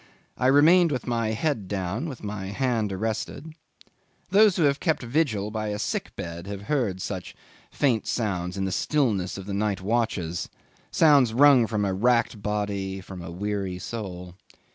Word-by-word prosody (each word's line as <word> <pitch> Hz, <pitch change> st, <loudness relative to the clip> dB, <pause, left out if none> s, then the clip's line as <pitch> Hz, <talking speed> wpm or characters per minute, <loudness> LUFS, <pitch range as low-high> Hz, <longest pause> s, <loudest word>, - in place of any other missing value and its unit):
I 125 Hz, -, +1 dB
remained 160 Hz, +5 st, +6 dB
with 125 Hz, -4 st, -2 dB
my 115 Hz, -2 st, 0 dB
head 110 Hz, -1 st, -1 dB
down, 100 Hz, -, -3 dB
with 130 Hz, -6 st, -9 dB
my 100 Hz, -2 st, -5 dB
hand 115 Hz, -1 st, -1 dB
arrested. 110 Hz, +9 st, -4 dB, 0.8 s
Those 205 Hz, -1 st, +6 dB
who 170 Hz, -, +2 dB
have 140 Hz, -1 st, +2 dB
kept 160 Hz, -6 st, 0 dB
vigil 115 Hz, -6 st, 0 dB
by 110 Hz, 0 st, -3 dB
a 105 Hz, 0 st, -2 dB
sick 105 Hz, -, -3 dB
bed 85 Hz, +1 st, -6 dB
have 100 Hz, 0 st, -6 dB
heard 115 Hz, -8 st, -1 dB
such 95 Hz, -3 st, -5 dB, 0.3 s
faint 125 Hz, -6 st, 0 dB
sounds 90 Hz, -5 st, -2 dB
in 95 Hz, -, -1 dB
the 95 Hz, -, -2 dB
stillness 105 Hz, -, 0 dB
of 95 Hz, -, -7 dB
the 100 Hz, -, -5 dB
night 100 Hz, -1 st, 0 dB
watches, 95 Hz, -5 st, -1 dB, 0.4 s
sounds 140 Hz, -8 st, +4 dB
wrung 135 Hz, -3 st, +6 dB
from 105 Hz, -2 st, -1 dB
a 95 Hz, -, 0 dB
racked 115 Hz, +1 st, +1 dB
body, 100 Hz, -2 st, -2 dB
from 95 Hz, -1 st, -9 dB
a 85 Hz, -, -7 dB
weary 95 Hz, +1 st, -3 dB
soul. 90 Hz, -3 st, -6 dB
105 Hz, 165 wpm, -25 LUFS, 95-130 Hz, 0.8 s, remained